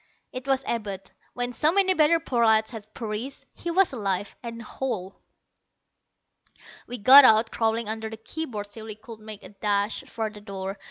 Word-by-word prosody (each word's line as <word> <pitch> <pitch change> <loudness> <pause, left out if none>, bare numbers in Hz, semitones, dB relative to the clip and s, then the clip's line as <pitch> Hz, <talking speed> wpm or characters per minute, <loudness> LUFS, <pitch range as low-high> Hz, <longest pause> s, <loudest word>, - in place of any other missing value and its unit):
It 255 +1 -6
was 270 0 +1
Abud. 200 -4 -4 0.2
When 245 0 -2
so 300 +6 +2
many 380 0 +3
better 325 0 +4
prolats 225 -7 +2
had 215 -2 -10
perished, 225 +4 -5
he 345 - -6
was 365 -2 +3
alive 200 -4 -2
and 230 -1 -7
whole. 220 -5 -5 1.7
We 245 - -5
got 265 +6 +9
out, 220 -2 +5
crawling 225 0 0
under 220 0 -3
the 225 - -8
key 315 +9 -5
boards 205 -4 -6
till 220 +1 -10
we 215 -2 -6
could 220 +1 -12
make 215 -1 -8
a - - -9
dash 205 +1 -1
for 220 -1 -4
the 210 -1 -12
door. 195 -1 -6
225 Hz, 175 wpm, -26 LUFS, 210-255 Hz, 1.7 s, got